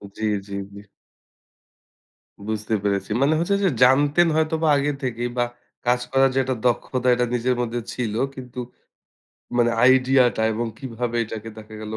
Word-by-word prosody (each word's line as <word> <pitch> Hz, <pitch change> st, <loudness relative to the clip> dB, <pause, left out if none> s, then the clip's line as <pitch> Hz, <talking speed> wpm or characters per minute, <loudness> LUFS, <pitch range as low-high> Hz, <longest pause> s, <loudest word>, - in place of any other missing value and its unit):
জ্বী, 110 Hz, -, -3 dB, 0.2 s
জ্বী, 100 Hz, -1 st, -6 dB
জ্বী। 100 Hz, -, -11 dB, 1.6 s
বুঝতে 110 Hz, 0 st, -3 dB
পেরেছি। 100 Hz, -1 st, -1 dB
মানে 145 Hz, +3 st, +3 dB
হচ্ছে 200 Hz, +4 st, +1 dB
যে 190 Hz, -, +4 dB
জানতেন 145 Hz, +6 st, +4 dB
হয়তো 160 Hz, 0 st, +1 dB
বা 160 Hz, -, +3 dB
আগে 145 Hz, +1 st, 0 dB
থেকেই 120 Hz, -1 st, -2 dB
বা 120 Hz, -, +3 dB, 0.4 s
কাজ 125 Hz, 0 st, +2 dB
করার 135 Hz, 0 st, +4 dB
যে -, -, -3 dB
একটা 130 Hz, 0 st, -2 dB
দক্ষতা 125 Hz, +1 st, 0 dB
এটা 125 Hz, 0 st, +1 dB
নিজের 125 Hz, +1 st, 0 dB
মধ্যে 120 Hz, 0 st, -2 dB
ছিল। 115 Hz, -4 st, -3 dB, 0.2 s
কিন্তু 125 Hz, -1 st, -8 dB, 1.0 s
মানে 120 Hz, -1 st, +3 dB
আইডিয়াটা 130 Hz, -2 st, +4 dB
এবং 115 Hz, +2 st, -2 dB
কিভাবে 120 Hz, -2 st, -4 dB
এটাকে 110 Hz, 0 st, -7 dB
দেখা 110 Hz, 0 st, -11 dB
গেলো। 110 Hz, 0 st, -5 dB
125 Hz, 155 wpm, -23 LUFS, 110-135 Hz, 1.6 s, যে